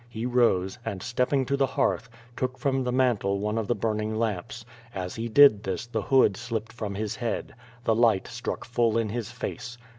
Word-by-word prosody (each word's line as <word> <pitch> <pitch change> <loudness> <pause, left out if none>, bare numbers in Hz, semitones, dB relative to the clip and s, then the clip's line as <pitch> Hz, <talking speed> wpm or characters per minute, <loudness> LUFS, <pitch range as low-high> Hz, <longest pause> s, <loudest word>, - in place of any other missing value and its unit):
He 115 0 -5
rose, 120 -5 +2
and 95 -5 -5
stepping 125 +3 +1
to 140 - 0
the 135 -1 +2
hearth, 120 -2 0 0.3
took 130 0 -2
from 135 -2 0
the 125 - -1
mantel 120 -6 +2
one 105 +2 -1
of 110 - -3
the 120 - +1
burn 110 0 -1
ing 110 0 -2
lamps. 110 +1 -3 0.3
As 90 -1 -4
he 115 +1 -4
did 125 -3 +7
this 95 +2 -3
the 120 - -3
hood 130 -7 +4
slipped 115 -1 -4
from 105 -4 -5
his 105 0 -3
head. 120 -2 -3 0.3
The 115 - +2
light 110 -4 +3
struck - - -5
full 115 -2 +1
in 115 -2 0
his 115 +1 -4
face. 125 0 -6
115 Hz, 205 wpm, -27 LUFS, 105-125 Hz, 0.3 s, did